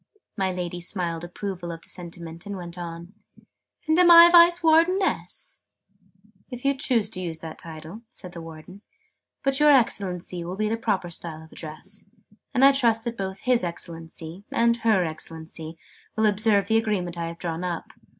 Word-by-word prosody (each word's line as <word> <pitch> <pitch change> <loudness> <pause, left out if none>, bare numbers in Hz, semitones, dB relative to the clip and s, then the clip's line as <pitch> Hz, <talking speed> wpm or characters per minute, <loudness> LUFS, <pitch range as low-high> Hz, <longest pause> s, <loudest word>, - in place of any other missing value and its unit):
My 190 -3 0
Lady 180 -1 -5
smiled 170 -2 -3
approval 175 0 -5
of 165 0 -9
the - - -20
sentiment, 170 -1 -5
and 200 -1 -5
went 175 -1 -7
on. 170 +1 -8 0.7
"And 315 +2 +3
am 355 -1 +6
I 340 0 +10
Vice 345 0 +7
Wardeness?" 335 +4 +1 0.9
"If 250 0 -9
you 275 - +4
choose 250 -6 +1
to 185 -4 -3
use 165 -3 -3
that 160 -1 -9
title," 160 +5 -10
said 180 -7 -11
the 170 -2 -9
Warden: 165 +4 -11 0.6
"but 275 0 +1
'Your 300 0 +6
Excellency' 185 -9 +1
will 175 +2 -5
be 215 +1 -1
the 225 - 0
proper 205 -6 -2
style 160 -1 -6
of 160 - -17
address. 175 +6 -9 0.5
And 260 +2 +4
I 275 - +8
trust 235 -5 +3
that 235 0 -4
both 190 -2 -5
'His 250 -4 +2
Excellency' 165 +1 -5
and 235 0 +2
'Her 220 -6 +2
Excellency' 160 0 -6 0.4
will 220 -1 +2
observe 210 -1 +2
the 225 - +3
Agreement 200 -6 -1
I 170 -1 -3
have 170 0 -7
drawn 165 0 -4
up. 175 -2 -4
185 Hz, 175 wpm, -25 LUFS, 170-230 Hz, 0.9 s, I